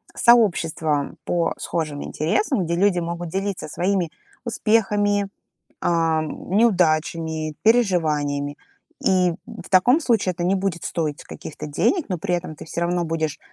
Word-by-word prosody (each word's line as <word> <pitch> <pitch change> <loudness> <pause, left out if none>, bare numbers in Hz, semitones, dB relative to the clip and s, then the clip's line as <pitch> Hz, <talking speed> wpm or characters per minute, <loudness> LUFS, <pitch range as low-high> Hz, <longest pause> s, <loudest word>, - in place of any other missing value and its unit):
сообщества 165 -10 +3
по 170 -1 0
схожим 155 -4 -3
интересам, 200 - 0
где 170 +1 -1
люди 185 0 +3
могут 170 0 -4
делиться 195 +2 -3
своими 180 +2 0 0.4
успехами, 205 -3 +1 0.5
ам, 165 -2 0
неудачами, 165 -6 +1
переживаниями. 155 -11 +2 0.5
И 180 -2 +3
в - - -10
таком 240 - +5
случае 230 - +1
это 175 0 -5
не 185 +2 +2
будет 190 -3 -2
стоить 155 -4 -2
каких-то 150 0 -8
денег, 295 - +1
но 185 - -1
при 180 +1 -1
этом 175 -3 -4
ты - - -9
всё 165 - -5
равно 175 0 0
будешь 160 -2 -2
175 Hz, 135 wpm, -22 LUFS, 160-200 Hz, 0.5 s, таком